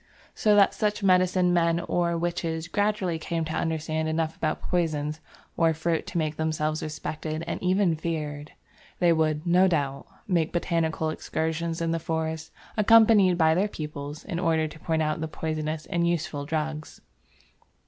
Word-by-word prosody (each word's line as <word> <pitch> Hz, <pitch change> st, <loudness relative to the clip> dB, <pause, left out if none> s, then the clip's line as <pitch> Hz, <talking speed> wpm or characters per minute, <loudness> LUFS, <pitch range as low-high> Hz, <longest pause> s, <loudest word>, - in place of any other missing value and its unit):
So 210 Hz, -1 st, +3 dB
that 200 Hz, -1 st, +5 dB
such 210 Hz, -1 st, -1 dB
medicine 185 Hz, -1 st, +3 dB
men 170 Hz, -1 st, +2 dB
or 170 Hz, 0 st, 0 dB
witches 165 Hz, -1 st, -2 dB
gradually 200 Hz, -3 st, 0 dB
came 165 Hz, 0 st, -2 dB
to 160 Hz, -, -4 dB
understand 160 Hz, -1 st, -1 dB
enough 160 Hz, 0 st, -1 dB
about 155 Hz, -1 st, -1 dB
poisons 155 Hz, -3 st, -1 dB, 0.4 s
or 165 Hz, -1 st, +3 dB
fruits 160 Hz, +1 st, -1 dB
to -, -, -3 dB
make 155 Hz, -2 st, -1 dB
themselves 155 Hz, -1 st, -1 dB
respected 155 Hz, +1 st, -4 dB
and 170 Hz, -, -4 dB
even 185 Hz, -2 st, +2 dB
feared. 155 Hz, -2 st, -4 dB, 0.4 s
They 175 Hz, -2 st, +4 dB
would, 155 Hz, -1 st, 0 dB
no 180 Hz, +2 st, +5 dB
doubt, 140 Hz, -6 st, -1 dB, 0.2 s
make 170 Hz, -5 st, +1 dB
botanical 165 Hz, -2 st, 0 dB
excursions 160 Hz, +1 st, -2 dB
in 165 Hz, 0 st, 0 dB
the 165 Hz, -, 0 dB
forest, 160 Hz, 0 st, -3 dB, 0.2 s
accompanied 215 Hz, -4 st, +6 dB
by 160 Hz, -2 st, +4 dB
their 190 Hz, +5 st, +2 dB
pupils, 150 Hz, -4 st, -7 dB
in 170 Hz, -, -3 dB
order 160 Hz, -3 st, +1 dB
to 155 Hz, -, -12 dB
point 160 Hz, -1 st, 0 dB
out 155 Hz, 0 st, -1 dB
the 160 Hz, -, -2 dB
poisonous 155 Hz, 0 st, -3 dB
and 170 Hz, -2 st, 0 dB
useful 165 Hz, -4 st, -2 dB
drugs. 155 Hz, -1 st, -4 dB
160 Hz, 160 wpm, -26 LUFS, 155-175 Hz, 0.4 s, accompanied